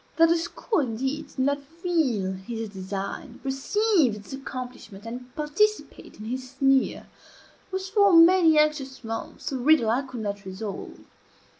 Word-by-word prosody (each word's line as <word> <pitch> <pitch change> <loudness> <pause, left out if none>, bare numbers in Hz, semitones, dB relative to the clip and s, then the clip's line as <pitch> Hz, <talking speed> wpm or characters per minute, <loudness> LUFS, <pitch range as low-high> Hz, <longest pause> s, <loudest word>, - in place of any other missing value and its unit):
That 330 0 +6
the 335 - +4
school, 345 +5 -2
indeed, 265 +3 -2
did - - -21
not 280 +2 +1
feel 295 - -1
his 220 +4 -6
design, 195 0 -6
perceive 275 - +2
its 210 +5 -10
accomplishment, 250 -6 -8
and 245 +2 -7
participate 420 +9 -1
in 215 - -9
his 255 +2 -4
sneer, 270 -1 +2 0.7
was, 380 0 -3
for 405 0 +4
many 335 -1 +7
anxious 300 -4 +1
months, 225 +4 -5
a 265 - -2
riddle 250 -4 +4
I 245 +4 +2
could 260 -4 -7
not 205 -1 -4
resolve. 195 +2 -7
270 Hz, 145 wpm, -26 LUFS, 225-325 Hz, 0.7 s, many